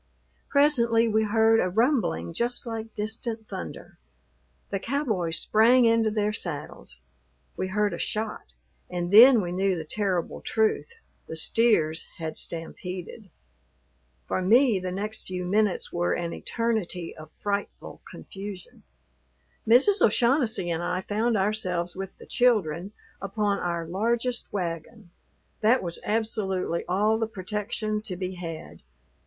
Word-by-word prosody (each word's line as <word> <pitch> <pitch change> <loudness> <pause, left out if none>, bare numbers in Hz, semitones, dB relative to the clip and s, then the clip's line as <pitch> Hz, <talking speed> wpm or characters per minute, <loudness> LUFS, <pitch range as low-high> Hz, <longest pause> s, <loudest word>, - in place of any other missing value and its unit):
Presently 235 -6 +4
we 220 0 +2
heard 225 +1 +4
a 185 - +1
rumbling 220 - +1
just 240 +1 -1
like 225 -1 -6
distant 220 +1 -4
thunder. 80 -3 -8 0.7
The 195 - -1
cowboys 215 - -1
sprang 235 +3 +4
into 230 -1 +3
their 210 0 0
saddles; 145 - -5 0.5
we 185 - -2
heard 205 +2 0
a - - -5
shot, 215 - -3 0.4
and 175 0 -3
then 240 +2 +9
we 175 -2 -4
knew 190 +1 +1
the 160 - -5
terrible 185 -1 -2
truth, 220 - 0 0.3
the 160 - -6
steers 165 -4 +2
had 160 -1 -5
stampeded. 180 +4 -6 1.0
For - - -1
me, 225 +2 +4
the 185 0 -4
next 210 +4 -4
few 180 -1 -4
minutes 205 +1 +1
were 175 0 +1
an 170 -1 -3
eternity 215 -7 -2
of 155 -1 -11
frightful 200 0 -4
confusion. 195 -2 -9 0.9
Mrs. 285 - +5
O'Shaughnessy 235 - +2
and 165 0 -1
I 180 +1 -1
found 220 +3 0
ourselves 185 -4 -1
with 195 0 -7
the - - -13
children 200 -7 +1 0.3
upon 200 +1 -1
our 170 -1 -2
largest 235 +7 -1
wagon; 175 +2 -5 0.5
that 230 +4 +3
was 170 -1 -2
absolutely 205 -6 -1
all 210 +4 +2
the 225 - 0
protection 210 +2 -3
to 210 -4 -6
be 185 +1 -4
had. 165 -3 -8
205 Hz, 130 wpm, -26 LUFS, 180-225 Hz, 1.0 s, then